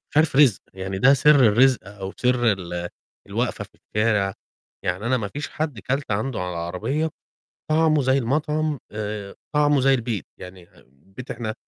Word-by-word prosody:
مش -, -, -12 dB
عارف 155 Hz, -3 st, +3 dB
رزق 135 Hz, -8 st, +5 dB
يعني 95 Hz, 0 st, -4 dB
ده 135 Hz, +7 st, +6 dB
سر 140 Hz, -1 st, +6 dB
الرزق 125 Hz, +4 st, +5 dB
أو 100 Hz, -1 st, -7 dB
سر 125 Hz, -2 st, +2 dB
ال 90 Hz, -2 st, -5 dB, 0.4 s
الواقفة -, -, -2 dB
في -, -, -19 dB, 0.3 s
الشارع، 105 Hz, -3 st, +2 dB, 0.5 s
يعني 90 Hz, +5 st, -2 dB
أنا 130 Hz, +2 st, +2 dB
ما 105 Hz, -4 st, -3 dB
فيش 140 Hz, +4 st, -5 dB
حد 150 Hz, -6 st, -4 dB
كلت 135 Hz, +2 st, -2 dB
عنده 110 Hz, +5 st, -1 dB
على 90 Hz, -1 st, -4 dB
عربية 90 Hz, -, -2 dB, 0.6 s
طعمه 155 Hz, -1 st, +3 dB
زي 130 Hz, +1 st, +3 dB
المطعم 150 Hz, +3 st, 0 dB
آآ، 105 Hz, -1 st, -5 dB, 0.2 s
طعمه 145 Hz, -1 st, +4 dB
زي 135 Hz, +1 st, +4 dB
البيت، 115 Hz, -5 st, -2 dB
يعني 90 Hz, -1 st, -11 dB
أم -, -, -26 dB, 0.3 s
بيت 130 Hz, -, -8 dB
إحنا 115 Hz, -2 st, -4 dB
120 Hz, 170 wpm, -23 LUFS, 100-140 Hz, 0.6 s, ده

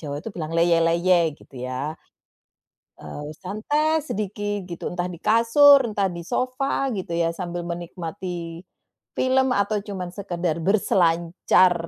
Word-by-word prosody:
Jawa 145 Hz, -2 st, -5 dB
itu 225 Hz, -, -6 dB
bilang 165 Hz, 0 st, -4 dB
leyeh-leyeh 170 Hz, -1 st, +3 dB
gitu -, -, -21 dB, 0.2 s
ya, 135 Hz, +4 st, -3 dB, 1.0 s
eee, 145 Hz, 0 st, -8 dB
santai 295 Hz, +12 st, 0 dB
sedikit 205 Hz, -1 st, -3 dB
gitu, 170 Hz, -2 st, -6 dB
entah 175 Hz, 0 st, -3 dB
di 170 Hz, -, -10 dB
kasur, 245 Hz, +6 st, +6 dB
entah 205 Hz, -4 st, 0 dB
di 170 Hz, -, -7 dB
sofa 265 Hz, +5 st, -1 dB
gitu 185 Hz, -2 st, -5 dB
ya, 170 Hz, 0 st, +1 dB
sambil 175 Hz, -1 st, -4 dB
menikmati, 170 Hz, 0 st, -6 dB, 0.5 s
film 260 Hz, 0 st, +2 dB
atau 210 Hz, +1 st, 0 dB
cuman 185 Hz, -3 st, -4 dB
sekedar 175 Hz, -4 st, -2 dB
berselancar 175 Hz, -2 st, +3 dB
180 Hz, 125 wpm, -24 LUFS, 170-215 Hz, 1.0 s, kasur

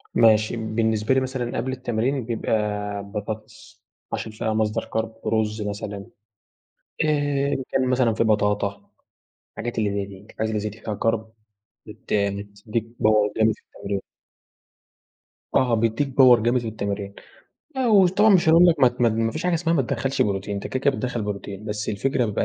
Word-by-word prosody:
ماشي، 110 Hz, -1 st, +4 dB
بالنسبة 110 Hz, +1 st, 0 dB
لي 130 Hz, -, +4 dB
مثلًا 130 Hz, -2 st, -3 dB
قبل 125 Hz, +3 st, -2 dB
التمرين 125 Hz, +1 st, -1 dB
بيبقى 115 Hz, -1 st, -3 dB, 0.5 s
بطاطس 110 Hz, +1 st, -8 dB, 0.3 s
عشان 110 Hz, -, -3 dB
فيها 110 Hz, +1 st, -2 dB
مصدر 110 Hz, 0 st, 0 dB
carb 110 Hz, 0 st, -4 dB
رُز 110 Hz, -1 st, 0 dB
مثلًا. 100 Hz, -1 st, -5 dB, 1.0 s
آآ 145 Hz, -2 st, +1 dB
إن 135 Hz, -, -2 dB
كان 130 Hz, -1 st, +1 dB
مثلًا 125 Hz, -3 st, +2 dB
في 110 Hz, -, +1 dB
بطاطا 105 Hz, -2 st, 0 dB, 0.6 s
الحاجات 120 Hz, 0 st, -5 dB
اللي 105 Hz, -2 st, +1 dB
زي 100 Hz, 0 st, -2 dB
دي، 100 Hz, 0 st, -13 dB
الحاجات 110 Hz, -, -2 dB
اللي 110 Hz, -1 st, -1 dB
زي 105 Hz, -, -2 dB
دي 105 Hz, +2 st, -12 dB
فيها 105 Hz, -2 st, -4 dB
carb 115 Hz, -1 st, +2 dB, 0.7 s
بت 105 Hz, -, -10 dB
بتدّيك 100 Hz, +2 st, -2 dB, 0.2 s
power 105 Hz, -1 st, +4 dB
جامد 110 Hz, 0 st, +4 dB
في -, -, -24 dB
التمرين. 100 Hz, 0 st, -5 dB, 1.6 s
آه، 125 Hz, -2 st, +3 dB
بيدّيك 115 Hz, +5 st, +1 dB
power 125 Hz, -2 st, +8 dB
جامد 120 Hz, +3 st, +2 dB
في 115 Hz, -, -5 dB
التمرين. 100 Hz, -2 st, -4 dB, 0.6 s
لأ، 260 Hz, -1 st, 0 dB
وطبعًا 200 Hz, 0 st, +5 dB
مش 170 Hz, -3 st, +4 dB
هاقول 165 Hz, +2 st, +7 dB
لك 165 Hz, -4 st, +3 dB
ما 130 Hz, -, +7 dB
ت 120 Hz, +1 st, -12 dB
ما 120 Hz, -, +5 dB
ت -, -, -1 dB
ما 115 Hz, 0 st, 0 dB
فيش 155 Hz, -, -4 dB
حاجة 180 Hz, -1 st, +2 dB
اسمها 165 Hz, 0 st, +1 dB
ما 145 Hz, -, +3 dB
تدخَّلش 135 Hz, +1 st, 0 dB
بروتين، 100 Hz, 0 st, -2 dB
أنت 100 Hz, -, -4 dB
كده، 130 Hz, -, -3 dB
كده 140 Hz, -, +4 dB
بتدخَّل 125 Hz, -3 st, -2 dB
بروتين، 100 Hz, 0 st, -5 dB
بس 105 Hz, -1 st, -4 dB
الفكرة 125 Hz, +4 st, 0 dB
بيبقى 105 Hz, -, -1 dB
110 Hz, 175 wpm, -23 LUFS, 105-130 Hz, 1.6 s, power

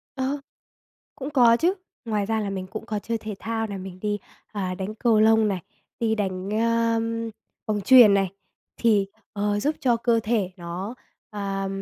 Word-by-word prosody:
Ờ. 270 Hz, +2 st, -1 dB, 0.8 s
Cũng 275 Hz, +2 st, -6 dB
có 240 Hz, -5 st, +6 dB
chứ. 345 Hz, +9 st, +2 dB, 0.3 s
Ngoài 210 Hz, -3 st, -1 dB
ra 220 Hz, +1 st, 0 dB
là 205 Hz, -2 st, -2 dB
mình 190 Hz, -1 st, -4 dB
cũng 220 Hz, +3 st, -7 dB
có 215 Hz, -2 st, -2 dB
chơi 230 Hz, +2 st, -3 dB
thể 215 Hz, -1 st, -6 dB
thao 225 Hz, 0 st, -2 dB
này, 200 Hz, -2 st, -5 dB
mình 185 Hz, -1 st, -8 dB
đi, 210 Hz, -1 st, 0 dB, 0.3 s
à, 190 Hz, -3 st, -2 dB
đánh 190 Hz, +3 st, -5 dB
cầu 225 Hz, -1 st, +3 dB
lông 220 Hz, 0 st, +5 dB
này, 190 Hz, -3 st, -1 dB, 0.4 s
đi 225 Hz, -1 st, +2 dB
đánh, 190 Hz, -3 st, -2 dB
ơm, 230 Hz, 0 st, +1 dB, 0.4 s
bóng 210 Hz, -1 st, 0 dB
chuyền 235 Hz, -2 st, +8 dB
này, 195 Hz, -1 st, +2 dB, 0.5 s
thì, 210 Hz, -4 st, +3 dB, 0.3 s
ờ, 205 Hz, 0 st, 0 dB
giúp 295 Hz, +7 st, +1 dB
cho 245 Hz, -3 st, +3 dB
cơ 230 Hz, 0 st, +2 dB
thể 210 Hz, -5 st, 0 dB
nó 180 Hz, +5 st, -5 dB, 0.4 s
à, 195 Hz, -2 st, -3 dB
215 Hz, 180 wpm, -25 LUFS, 200-230 Hz, 0.8 s, chuyền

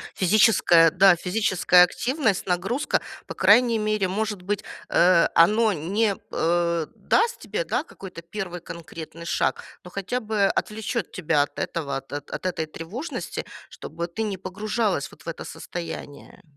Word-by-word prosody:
Физическая, 185 Hz, -5 st, +5 dB
да, 185 Hz, 0 st, +6 dB
физическая 180 Hz, -1 st, +4 dB
активность, 235 Hz, -, 0 dB
нагрузка. 195 Hz, +9 st, 0 dB, 0.2 s
По -, -, -7 dB
крайней 225 Hz, +4 st, +4 dB
мере, 215 Hz, -2 st, 0 dB
может 205 Hz, -1 st, -3 dB
быть, 205 Hz, +1 st, -2 dB, 0.3 s
э, 175 Hz, -1 st, +5 dB
оно 215 Hz, +5 st, +4 dB
не, 195 Hz, +6 st, 0 dB, 0.2 s
э, 170 Hz, -1 st, 0 dB
даст 470 Hz, +1 st, +1 dB
тебе, -, -, -3 dB
да, -, -, -1 dB
какой-то 180 Hz, -3 st, -10 dB
1 175 Hz, 0 st, -6 dB
конкретный 165 Hz, -1 st, -9 dB
шаг. -, -, 0 dB, 0.2 s
Но 180 Hz, -, -10 dB
хотя 200 Hz, +7 st, -3 dB
бы 215 Hz, -3 st, 0 dB
отвлечет 215 Hz, +1 st, -2 dB
тебя 150 Hz, -4 st, +1 dB
от 145 Hz, -, -3 dB
этого, 140 Hz, -5 st, -3 dB
от 135 Hz, 0 st, -11 dB
от 145 Hz, +5 st, -6 dB
этой 160 Hz, -3 st, -2 dB
тревожности, 185 Hz, -, -6 dB, 0.3 s
чтобы 170 Hz, +1 st, -6 dB
ты 200 Hz, +6 st, -6 dB
не 205 Hz, -3 st, -2 dB
погружалась 200 Hz, -2 st, -2 dB
вот -, -, -17 dB
в -, -, -17 dB
это 165 Hz, -, -5 dB
состояние. 165 Hz, -4 st, -8 dB
185 Hz, 145 wpm, -24 LUFS, 170-215 Hz, 0.3 s, да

